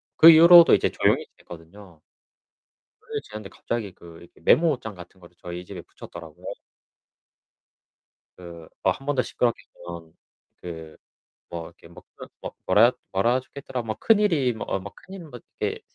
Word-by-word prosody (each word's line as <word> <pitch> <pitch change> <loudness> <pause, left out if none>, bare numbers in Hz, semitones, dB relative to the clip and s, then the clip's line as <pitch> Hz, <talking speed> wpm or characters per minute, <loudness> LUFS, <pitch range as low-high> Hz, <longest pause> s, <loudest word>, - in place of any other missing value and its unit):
그 165 - +9
이후로도 170 +1 +8
이제 - - +3
조용히 - - +1
지냈거든요. 85 +1 -14 1.0
그렇게 - - -6
지냈는데 105 -1 -9
갑자기 110 -5 -5
그 85 -1 -14
이렇게 85 - -18
메모장 130 - +2
같은 90 +1 -14
거를 85 0 -18
저희 90 0 -7
집에 90 -1 -9
붙였더라고요. 80 -2 -13 1.9
그 85 -2 -11 0.2
뭐 95 - +3
1 135 - -13
번 145 0 -1
더 130 - +2
시끄럽게 120 -1 -1 0.2
굴면 85 -2 -9 0.5
그 80 -2 -9 0.5
뭐 85 -1 -6
이렇게 - - -17
뭐 85 - -15
그런 - - -10 0.4
뭐라 110 +6 +5 0.2
뭐라 115 +7 +2
젹혀있더라. 130 -1 -7
뭐 110 -2 -5
큰일이 190 - +3
뭐 110 - -7
어 95 - -1
뭐 100 +2 -9
큰일이 190 -1 -11
뭐 135 -6 -11 0.2
이렇게 - - -2
100 Hz, 325 characters per minute, -24 LUFS, 85-130 Hz, 1.9 s, 그